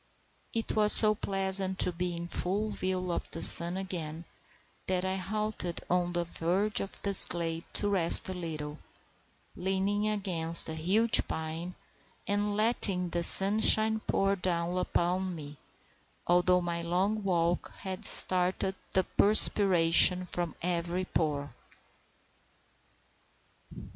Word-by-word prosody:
It 225 -1 -5
was 210 -1 +5
so 215 -1 +9
pleasant 190 -2 -4
to 180 - -2
be 175 0 -6
in 170 0 -9
full 200 +5 -5
view 185 -2 -6
of - - -7
the - - -2
sun 170 +2 +8
again, 170 -4 -8 0.6
that 185 0 -4
I 190 0 -5
halted 210 -2 -6
on 175 -1 -3
the 175 0 -3
verge 180 +5 -5
of 195 - -9
this 200 -2 +8
glade 165 -1 -6
to 205 - -3
rest 185 -5 +4
a 190 - -6
little, 155 -4 -9 0.8
leaning 195 +3 -4
against 175 -6 0
a - - -7
huge 195 +9 +1
pine, 160 +3 -8 0.5
and 205 0 -4
letting 205 -5 -2
the 170 - -4
sunshine 215 +4 +4
pour 195 0 -2
down 175 -2 -5
upon 185 0 -4
me, 145 -2 -12 0.7
although 180 +1 -1
my 170 -1 -6
long 185 +6 -4
walk 175 -2 -4
had 190 -1 -9
started 185 +1 +2 0.2
the 190 - 0
perspiration 185 -4 +4
from 175 -1 -7
every 175 +1 -4
pore. 145 -6 -6
180 Hz, 125 wpm, -26 LUFS, 170-195 Hz, 0.8 s, so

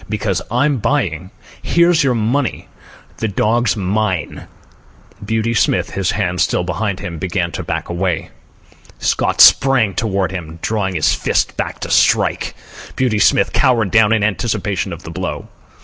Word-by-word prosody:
"Because 105 -3 -1
I'm 135 +4 +1
buying. 110 - -1 0.3
Here's 170 -1 +3
your 130 -3 +1
money. 120 +5 -1 0.5
The 110 - -2
dog's 110 +3 +1
mine." 95 -2 -2 0.8
Beauty 110 +2 -1
Smith, 115 - +1
his 95 -1 -1
hands 90 -4 -1
still - - +1
behind 95 +2 -3
him, 85 -2 -6
began 90 -1 -2
to - - -5
back - - -4
away. 90 -2 -2 0.7
Scott - - 0
sprang 130 -7 +6
toward 95 -3 -1
him, 85 -3 -7
drawing 100 -4 -1
his 75 -2 +2
fist - - -1
back - - -4
to - - -5
strike. - - +2 0.4
Beauty 120 -5 0
Smith - - +3
cowered 115 -7 +2
down 110 -2 +4
in 110 -2 +2
anticipation 105 -2 -1
of 85 - -8
the 80 - -8
blow. 95 +2 -5
105 Hz, 150 wpm, -17 LUFS, 95-115 Hz, 0.8 s, sprang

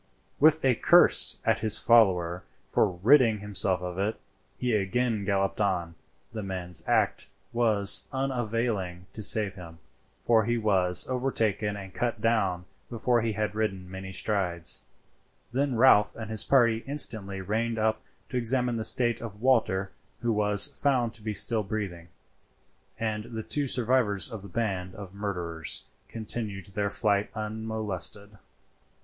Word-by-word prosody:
With 155 0 +4
a 130 - +4
curse - - +5
at - - +2
his 110 -1 +4
follower 95 -7 +3 0.2
for - - +2
ridding 110 +5 +3
himself 100 -2 0
of 90 0 -5
it, 105 +3 -2 0.4
he 125 -2 -1
again 110 +2 0
galloped 95 +1 -1
on. 90 -4 -1 0.4
The 110 - -5
man's 90 -4 -4
act - - +1 0.3
was 110 -4 +4
unavailing 115 -8 -3
to 110 - -6
save 105 -1 +3
himself, 90 -4 -11 0.5
for 110 -3 +3
he 120 +1 0
was 95 -5 +2
overtaken 110 -5 -1
and 95 -1 -10
cut 120 -2 -2
down 95 -6 0 0.2
before 120 0 0
he 110 -1 -2
had 105 0 -2
ridden 95 -4 -3
many 95 0 -8
strides; 90 -4 -1 0.7
then 135 +1 -1
Ralph 115 -4 +4
and 110 -2 -7
his 110 -1 +4
party 115 -4 +2
instantly 110 -9 -1
reined 110 +4 -2
up 110 0 0 0.3
to 125 - -3
examine 125 0 0
the 110 - -3
state 120 0 +3
of 105 -3 -8
Walter, 110 -6 +1 0.3
who 120 -1 0
was 105 -1 +4
found 125 -5 -1
to - - -7
be 110 0 -4
still 110 +2 +1
breathing, 95 -5 -5 0.9
and 110 -1 -3
the 110 -2 -7
two 145 +4 -1
survivors 125 -4 0
of 110 -3 -7
the 100 - -11
band 95 -3 -3
of 100 -2 -10
murderers 90 -6 -3 0.2
continued 110 -4 -5
their 100 +1 -3
flight 100 0 0
unmolested. 105 -2 -4
105 Hz, 145 wpm, -27 LUFS, 95-115 Hz, 0.9 s, curse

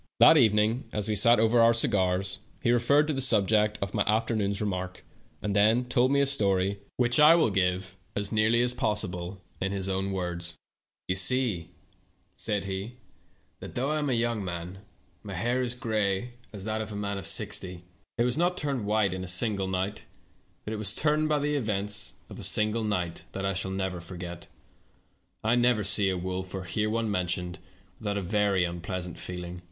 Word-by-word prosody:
That - - +9
evening, 110 -2 +3
as 105 -1 -1
we 110 - 0
sat 115 +4 +5
over 115 +2 +4
our 115 0 +6
cigars, 95 -5 +1 0.2
he 120 - +3
referred 130 +5 +4
to 155 - -1
the 135 - -1
subject 105 -3 +3
of 100 - -5
my 105 - 0
afternoon's 105 -2 +1
remark, 95 -3 -4 0.4
and 100 -1 -1
then 110 +4 +4
told 125 +1 +2
me 140 0 +3
a - - +4
story, 100 -7 +2 0.2
which 120 +1 +2
I 150 +2 +8
will 160 -10 +3
give, 95 0 -1 0.2
as 100 0 -1
nearly 110 +2 +3
as 125 0 +1
possible, 95 -5 -3 0.2
in 95 - -1
his 95 -1 -2
own 95 0 -1
words. 85 -2 -4 0.5
"You 90 - 0
see," 100 -3 0 0.7
said 105 -2 -2
he, 100 +5 -5 0.6
"that - - -9
though 135 +4 0
I 155 - 0
am 145 - -1
still 130 - +1
young, 95 -7 -2 0.5
my 100 -3 -7
hair 120 +8 0
is 120 -1 -1
gray 110 -1 -1 0.2
as 100 -4 -8
that 110 +1 -2
of 110 - -5
a - - -6
man 100 -1 -3
of - - -4
sixty. 95 -4 -2 0.3
It 120 - +3
was 125 +4 0
not 180 +1 +1
turned 135 - -2
white 105 -3 +2
in 95 0 -4
a - - -6
single 95 +2 0
night, 95 +2 -3 0.6
but 110 - -4
it - - -3
was 105 0 0
turned 155 0 +2
by 150 - +3
the 145 +1 -1
events 105 -6 -1
of - - -10
a - - -5
single 110 +1 +1
night 90 -6 -2
that 95 0 -3
I 95 - 0
shall 95 0 -3
never 95 -2 -3
forget. 85 -1 -8 1.0
I 110 +2 +2
never 120 -3 +3
see 100 0 +3
a 95 - -1
wolf, 95 +1 -4
or 95 - -4
hear 105 +5 -1
one 115 -1 -1
mentioned, 90 -1 -2 0.4
without 105 -2 -2
a 100 - -2
very 100 0 +2
unpleasant 85 +1 -5
feeling. 90 0 -6
105 Hz, 190 wpm, -28 LUFS, 95-115 Hz, 1.0 s, That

